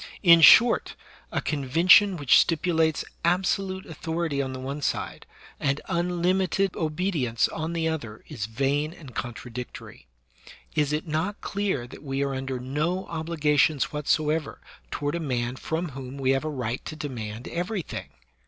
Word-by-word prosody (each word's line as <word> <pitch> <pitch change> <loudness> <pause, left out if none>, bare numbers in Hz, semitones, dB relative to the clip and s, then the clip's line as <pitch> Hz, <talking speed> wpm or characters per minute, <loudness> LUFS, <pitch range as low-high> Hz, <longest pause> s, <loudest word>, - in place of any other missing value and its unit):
In 170 -2 +8
short, 230 +9 +7 0.4
a - - -1
convention 165 +7 +4
which 140 -5 +5
stipulates 160 -2 +1 0.2
absolute 190 +2 0
authority 160 -2 -2
on 135 -1 -3
the 130 - -6
one 140 +3 -5
side - - -3 0.3
and 140 +1 0
unlimited 180 +2 0
obedience 155 - 0
on 160 +1 -4
the 165 -1 0
other 120 -10 -4
is 115 -9 -5
vain 140 +6 0
and 140 -7 -12
contradictory. 120 - -7 0.7
Is 150 -2 +1
it 150 +1 -1
not 160 +6 -2
clear 195 -11 -2
that 125 - -12
we 135 -1 -2
are 140 -1 -2
under 130 -1 -3
no 150 +9 -2
obli 165 0 -4
gations 150 -1 +2
whatsoever 150 +1 0 0.3
toward 145 - -2
a 170 - -1
man 125 -5 -2
from 160 +5 -3
whom 135 0 -8
we 135 -1 +1
have 135 +3 0
a - - -1
right 125 -4 -3
to - - -6
demand 120 -7 -6
everything 180 +1 -4
150 Hz, 150 wpm, -26 LUFS, 135-170 Hz, 0.7 s, In